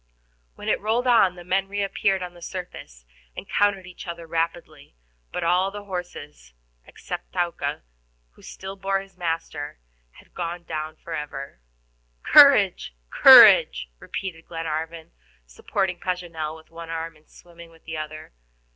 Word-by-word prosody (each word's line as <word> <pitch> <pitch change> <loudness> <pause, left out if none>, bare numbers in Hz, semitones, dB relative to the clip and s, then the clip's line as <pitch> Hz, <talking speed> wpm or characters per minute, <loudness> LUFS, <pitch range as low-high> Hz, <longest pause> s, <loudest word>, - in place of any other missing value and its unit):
When - - -10
it - - +2
had - - -24
rolled 225 +4 0
on, 220 -7 +4
the 175 - -11
men 190 +2 0
reappeared 195 -1 -1
on 180 -1 -7
the 175 - -16
surface, 170 - -9 0.3
and - - -7
counted 200 -2 +1
each 180 +1 -11
other 170 -1 -7
rapidly; 165 - -4 0.4
but 180 - -3
all 180 +3 +2
the 205 +1 -8
horses, 175 - -8 0.3
except - - -8
Thaouka, 175 - -2 0.5
who - - -22
still 190 +1 -9
bore 195 0 -1
his 195 -1 -16
master, 165 - -4 0.4
had - - -20
gone 175 0 -5
down 155 -1 -5
forever. 150 - -7 0.6
"Courage, - - +6 0.2
courage," - - +8
repeated 170 -4 -7
Glenarvan, 160 0 -5 0.3
supporting 185 - -3
Paganel 170 -4 -4
with 160 - -19
one 165 0 -9
arm, 165 0 -5
and 155 0 -25
swimming 170 -1 -15
with 165 0 -21
the 160 0 -5
other. 155 - -8
170 Hz, 145 wpm, -24 LUFS, 160-190 Hz, 0.6 s, courage